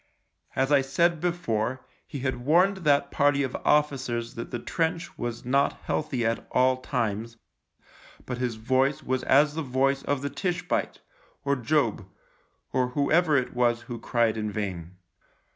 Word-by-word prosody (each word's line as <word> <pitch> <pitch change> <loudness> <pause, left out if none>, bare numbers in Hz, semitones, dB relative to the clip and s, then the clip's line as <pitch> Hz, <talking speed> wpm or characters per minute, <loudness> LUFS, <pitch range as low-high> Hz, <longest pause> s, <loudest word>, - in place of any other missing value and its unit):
As 135 +2 +1
I 140 -2 +6
said 170 +5 +1
before, 130 -9 -1 0.2
he 140 - -6
had 130 -2 -2
warned 180 +8 +4
that 140 -5 +2
party 140 0 +3
of 130 - -3
officers 130 -6 +1
that 115 - -6
the 120 - -3
trench 165 +6 -2
was 120 -1 -5
not 140 +3 +2
healthy 135 -6 -1
at 115 0 -1
all 130 0 +3
times, 115 -3 -3 0.9
but 125 -1 -4
his 125 -3 -1
voice 130 +5 +1
was 130 0 -1
as 145 +3 +4
the 160 - -3
voice 135 0 +1
of 140 -1 -2
the 140 - -1
Tishbite, 180 -3 -2 0.4
or 140 0 +2
Job, 120 -6 0 0.7
or 130 -1 +2
whoever 150 +4 +2
it 125 - -1
was 120 -1 +2
who 120 -2 -7
cried 115 -2 +1
in 105 -1 -2
vain. 95 -5 -5
130 Hz, 155 wpm, -27 LUFS, 120-145 Hz, 0.9 s, I